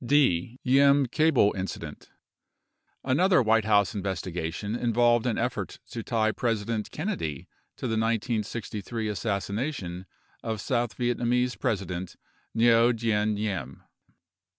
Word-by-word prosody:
D. 120 - +2
Diem 140 +2 +5
Cable 150 -5 +3
Incident 95 0 -6 0.9
Another 175 +8 +3
White 110 -1 +3
House 100 -3 +3
investigation 95 0 -3
involved 120 0 +2
an 115 - 0
effort - - -2
to 115 - -4
tie 110 -1 +1
Presi 115 -3 -1
dent 110 -1 -2
Kennedy 150 - -4 0.3
to - - -6
the 115 - -1
1963 110 -1 -2
assassination 100 - -3 0.3
of 110 -2 -3
South 120 -1 -1
Vietnamese 125 0 +1
Presi 100 -3 -1
dent 90 0 -6 0.4
Ngo 115 +1 +5
Dinh 110 -2 +1
Diem. 95 - -4
115 Hz, 115 wpm, -27 LUFS, 100-120 Hz, 0.9 s, Diem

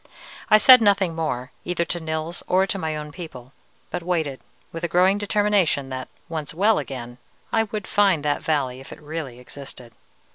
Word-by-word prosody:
I 215 - +8
said 250 +3 +9
nothing 200 -5 +3
more, 135 -6 -3
either 175 -1 -1
to 175 - -2
Nils 160 +1 -3
or 185 +1 +3
to 195 0 -3
my 160 -3 -2
own 150 0 -6
people, 140 -7 -10 0.4
but 180 - -3
waited, 160 -6 -1 0.3
with 165 - -7
a - - +1
growing 185 +4 +3
determination 205 -9 +1
that, 130 -1 -5 0.2
once 155 -3 -5
well 205 +5 +3
again, 120 -2 -7 0.3
I 225 0 +3
would 210 -1 -5
find 195 -8 +2
that 145 -1 +1
valley 135 -5 -1
if 135 - -12
it - - -10
really 150 -5 -6
existed. 125 -1 -11
160 Hz, 180 wpm, -23 LUFS, 140-190 Hz, 0.4 s, said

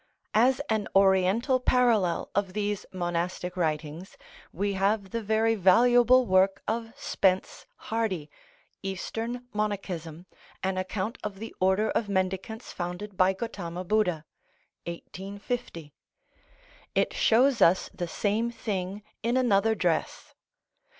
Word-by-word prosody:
As 250 +5 +4
an 220 -2 0
Oriental 195 +7 +4
parallel 235 -9 +2
of 195 -2 -1
these 205 -1 -2
monastic 175 0 -3
writings 160 +1 -3 0.3
we 200 +3 -1
have 195 0 0
the 230 - -2
very 220 +1 +2
valuable 240 +6 +5
work 190 0 +3
of 225 +1 -2
Spence 185 -1 0
Hardy, 215 -9 -2 0.5
"Eastern 225 +6 -4
Monachism; 185 -6 -3 0.4
an 190 0 0
Account 190 +4 -3
of 210 -2 -5
the 225 +3 -7
Order 190 +3 +2
of 215 - -1
Mendicants 190 +4 -2
founded 180 +3 -5
by 185 +1 +4
Gotama 185 -5 -5
Budha" 180 -6 +1 0.6
(1850). 195 -1 -6 1.0
It - - +2
shows 250 +2 +3
us 175 +3 +4
the 175 - -4
same 215 +6 0
thing 200 -3 -4 0.2
in 235 +3 +1
another 220 -3 +3
dress. 175 -6 -1
200 Hz, 115 wpm, -27 LUFS, 185-225 Hz, 1.0 s, valuable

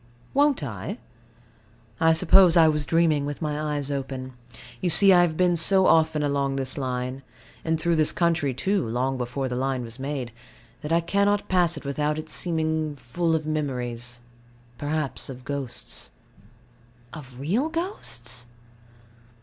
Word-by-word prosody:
Won't 285 - +2
I? 110 -5 -5 1.0
I 160 0 +4
suppose 180 +1 +5
I 165 -1 +7
was 150 -2 0
dreaming 165 -3 +2
with 145 0 -5
my 150 -1 -2
eyes 145 -1 -3
open. 130 -2 -5 0.5
You 180 - 0
see, 195 +2 +9
I 175 - +6
have 165 -3 0
been 180 -1 +3
so 190 +3 +3
often 160 -3 +3
along 140 -1 0
this 130 -1 -3
line 130 -1 -4 0.4
and 160 -1 -1
through 170 0 +1
this 155 -1 +4
country, 170 -5 0
too, 190 +10 -1
long 130 +3 -1
before 125 +2 -3
the 125 - -4
line 130 0 -2
was 115 +1 -8
made 135 -3 -4 0.5
that 150 - -6
I 170 +1 +3
cannot 200 +4 +1
pass 175 -3 +2
it 150 - -10
without 150 +2 -1
its 155 0 -3
seeming 160 -3 -1
full 160 +6 -1
of 155 -1 -2
memories 125 -5 -3 0.6
perhaps 150 -2 -3
of 130 -1 -9
ghosts. 140 -4 -6 1.0
Of 130 -4 -11
real 210 - 0
ghosts? 125 - -4
150 Hz, 150 wpm, -25 LUFS, 130-165 Hz, 1.0 s, see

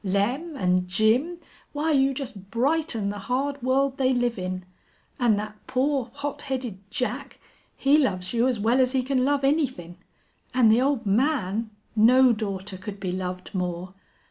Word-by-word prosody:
Lem 245 - -1
an' 180 -3 +1
Jim 225 - +2 0.4
why 305 +2 0
you 275 -2 +3
just 250 -8 -7
brighten 240 -3 0
the 205 - -6
hard 270 +6 -2
world 270 +2 +1
they 260 -1 +3
live 245 -3 0
in. 185 0 -4 0.5
An' 240 -4 +4
that 210 +1 -5
poor, 265 -1 0
hot 285 0 -4
headed 255 -7 -4
Jack 260 +2 -4 0.4
he 285 +2 +4
loves 185 -9 -1
you 235 +2 +3
as 250 -4 0
well 230 +5 +2
as 255 0 +2
he 260 -1 +1
can 260 0 +1
love 280 +1 +1
anythin'. 260 - 0 0.6
An' 245 -3 +5
the 225 +3 +5
old 265 -3 +1
man 220 -1 +1 0.3
no 250 +3 +6
daughter 200 -3 -4
could 195 +2 -8
be 190 -2 -3
loved 180 0 -5
more.... 180 0 -3
245 Hz, 165 wpm, -25 LUFS, 200-270 Hz, 0.6 s, no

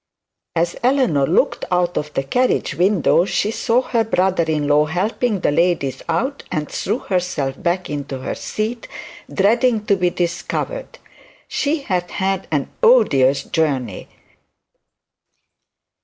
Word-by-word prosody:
As 170 +1 0
Eleanor 240 - +2
looked 170 - +1
out 180 -1 +1
of 150 0 -2
the 135 - 0
carriage 250 - 0
window, 180 -2 +3
she 200 +2 0
saw 235 +3 +1
her 235 -3 +1
brother 190 -4 +1
in 155 -2 -1
law 150 +1 +4
helping 200 +6 -1
the - - +2
ladies 165 -4 +1
out, 260 - -1
and 150 -1 -2
threw 210 +4 -2
herself 180 - -2
back 180 +1 0
into 140 -2 -4
her 130 - -4
seat, 225 +2 -4 0.4
dreading 225 +2 +2
to 200 - +3
be 180 -2 +1
discovered. 175 - -3 0.5
She 295 0 -1
had 180 -7 -1
had 190 0 -2
an 145 -3 -1
odious 140 - +4
journey. 135 - -1
180 Hz, 130 wpm, -20 LUFS, 150-225 Hz, 0.5 s, law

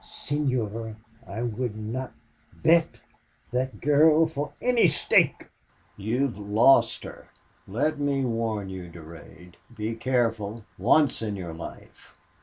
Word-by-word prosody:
"Senor, 115 -7 -3 0.3
I 105 +4 -4
would 120 -1 -3
not 115 +4 -5 0.5
bet 165 0 +5 0.6
that 130 +1 -2
girl 155 +2 +5
for 150 -2 -4
any 245 -5 +4
stake!" 155 - +2 0.5
"You 110 +6 -1
have 125 -7 -2
LOST 110 +6 +4
her... - - -11 0.4
Let 145 +10 -1
me 140 -2 0
warn 115 -4 -2
you, 95 -2 -7
Durade. 85 +1 -13 0.2
Be 110 +1 -2
careful, 115 -3 -1
once 145 -7 +3
in 105 -2 -3
your 90 -4 -6
life!... 80 +1 -11
115 Hz, 120 wpm, -26 LUFS, 105-140 Hz, 0.6 s, bet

